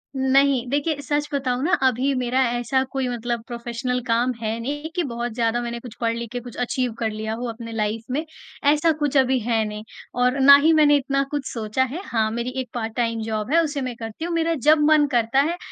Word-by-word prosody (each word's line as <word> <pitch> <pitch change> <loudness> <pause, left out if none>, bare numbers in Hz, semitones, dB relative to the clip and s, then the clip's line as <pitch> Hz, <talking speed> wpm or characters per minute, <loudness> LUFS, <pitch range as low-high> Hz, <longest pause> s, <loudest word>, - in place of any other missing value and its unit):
नहीं, 265 -1 +3
देखिए 285 +2 -1
सच 290 +1 -1
बताऊँ 260 -2 -1
ना 345 - +1
अभी 260 +3 +1
मेरा 255 +1 0
ऐसा 245 +2 0
कोई 265 -1 -1
मतलब 240 -1 -3
प्रोफेशनल 240 +1 -3
काम 235 +2 +2
है 220 +1 -2
नहीं 290 +6 -4
कि 355 - +1
बहुत 240 +1 -3
ज़्यादा 235 0 0
मैंने 235 0 -4
कुछ 235 -2 -10
पढ़ 230 0 +1
लिख 235 -1 -6
के 245 - -3
कुछ 245 -1 -11
अचीव 245 0 -1
कर 225 - 0
लिया 220 +1 -4
हो 240 +2 -4
अपनी 230 0 -7
लाइफ़ 220 0 -2
में। 305 +4 -1 0.5
ऐसा 305 +2 +3
कुछ 290 -1 +1
अभी 260 -1 +3
है 225 -1 0
नहीं। 210 0 -6 0.4
और 250 +2 +2
ना 280 +1 +9
ही 325 +1 +5
मैंने 300 -2 +5
इतना 275 0 0
कुछ 290 -2 -2
सोचा 225 +2 0
है, 270 +8 -4
हाँ, 220 -2 0
मेरी 235 +2 -3
एक 250 - -9
पार्ट-टाइम 230 0 -2
जॉब 220 +2 -3
है 335 - +6
उसे 290 -3 -3
मैं 255 -2 -4
करती 225 +7 -6
हूँ। 345 - -3
मेरा 330 0 +1
जब 310 0 +7
मन 300 -1 +5
करता 240 +2 +2
है 345 - -4
250 Hz, 220 wpm, -23 LUFS, 230-280 Hz, 0.5 s, ना